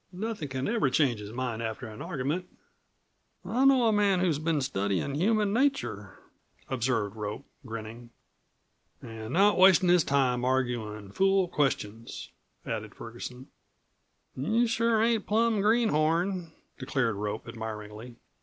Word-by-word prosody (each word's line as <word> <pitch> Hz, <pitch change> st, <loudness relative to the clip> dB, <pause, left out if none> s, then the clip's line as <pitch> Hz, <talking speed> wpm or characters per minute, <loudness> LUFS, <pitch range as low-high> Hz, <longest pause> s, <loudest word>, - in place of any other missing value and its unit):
Nothin' 200 Hz, -4 st, -4 dB
c'n 130 Hz, 0 st, -3 dB
ever 215 Hz, -, +1 dB
change 130 Hz, -5 st, +2 dB
his 105 Hz, 0 st, -8 dB
mind 120 Hz, -2 st, -3 dB
after 115 Hz, +2 st, -4 dB
an 110 Hz, -1 st, -10 dB
argument." 170 Hz, +2 st, -3 dB, 1.0 s
"I 255 Hz, +4 st, +1 dB
know 265 Hz, -3 st, +5 dB
a 220 Hz, -, +3 dB
man 200 Hz, -3 st, +3 dB
who's 170 Hz, -5 st, +1 dB
been 160 Hz, -1 st, 0 dB
studyin' 100 Hz, -2 st, -1 dB
human 205 Hz, +6 st, +1 dB
nature," 165 Hz, -, -1 dB, 0.5 s
observed 115 Hz, -5 st, -1 dB
Rope, 105 Hz, +5 st, -5 dB, 0.2 s
grinning. 115 Hz, +1 st, -7 dB, 0.9 s
"An' 110 Hz, 0 st, -7 dB
not 200 Hz, +2 st, +4 dB
wastin' 185 Hz, -1 st, +6 dB
his 175 Hz, -2 st, +5 dB
time 130 Hz, -3 st, +1 dB
arguin' 120 Hz, -6 st, -1 dB
fool 195 Hz, -, +2 dB
questions," 115 Hz, -8 st, -2 dB, 0.3 s
added 110 Hz, -2 st, -5 dB
Ferguson. 125 Hz, +2 st, -9 dB, 0.9 s
"You 220 Hz, -, +1 dB
sure 230 Hz, -1 st, +2 dB
ain't 230 Hz, -2 st, +1 dB
plum 220 Hz, 0 st, +2 dB
greenhorn," 180 Hz, -5 st, +1 dB, 0.3 s
declared 130 Hz, -3 st, 0 dB
Rope 105 Hz, +1 st, -4 dB
admiringly. 110 Hz, +1 st, -7 dB
135 Hz, 125 wpm, -28 LUFS, -, 1.0 s, wastin